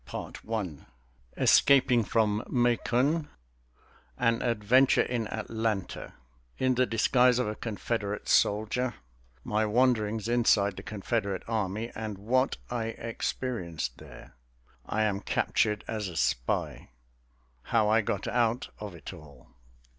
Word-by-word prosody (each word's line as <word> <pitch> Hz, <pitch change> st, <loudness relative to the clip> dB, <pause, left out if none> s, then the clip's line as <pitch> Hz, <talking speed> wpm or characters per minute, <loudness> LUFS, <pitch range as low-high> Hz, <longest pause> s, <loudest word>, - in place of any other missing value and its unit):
CHAPTER -, -, -7 dB
XI 95 Hz, -10 st, -3 dB, 0.6 s
Escaping 125 Hz, -4 st, +5 dB
from 110 Hz, 0 st, +1 dB
Macon 125 Hz, +5 st, +1 dB, 0.9 s
An 115 Hz, -1 st, +2 dB
adventure 120 Hz, +3 st, +3 dB
in 120 Hz, -3 st, -2 dB
Atlanta 110 Hz, -3 st, -3 dB, 0.4 s
In 130 Hz, 0 st, +2 dB
the 125 Hz, 0 st, +2 dB
disguise 125 Hz, +2 st, +3 dB
of 125 Hz, -, 0 dB
a 105 Hz, -, -2 dB
Confederate 105 Hz, -1 st, -3 dB
soldier 110 Hz, +4 st, +2 dB, 0.5 s
My 110 Hz, +1 st, 0 dB
wanderings 110 Hz, -2 st, +1 dB
inside 110 Hz, -5 st, +3 dB
the -, -, -7 dB
Confederate 100 Hz, -1 st, -2 dB
army 110 Hz, 0 st, -2 dB
and 110 Hz, -2 st, -5 dB
what 130 Hz, +7 st, +1 dB
I 120 Hz, -2 st, -1 dB
experienced 115 Hz, -, -4 dB
there -, -, -13 dB, 0.5 s
I 110 Hz, -, 0 dB
am 100 Hz, -2 st, 0 dB
captured 105 Hz, +1 st, 0 dB
as 110 Hz, -3 st, -3 dB
a 85 Hz, -3 st, -7 dB
spy -, -, -1 dB, 0.7 s
How 110 Hz, -, +1 dB
I 110 Hz, +1 st, +4 dB
got 100 Hz, -2 st, -3 dB
out 120 Hz, 0 st, 0 dB
of 105 Hz, -4 st, -7 dB
it 80 Hz, -, -9 dB
all. 70 Hz, -5 st, -15 dB
110 Hz, 120 wpm, -29 LUFS, 105-120 Hz, 0.9 s, Escaping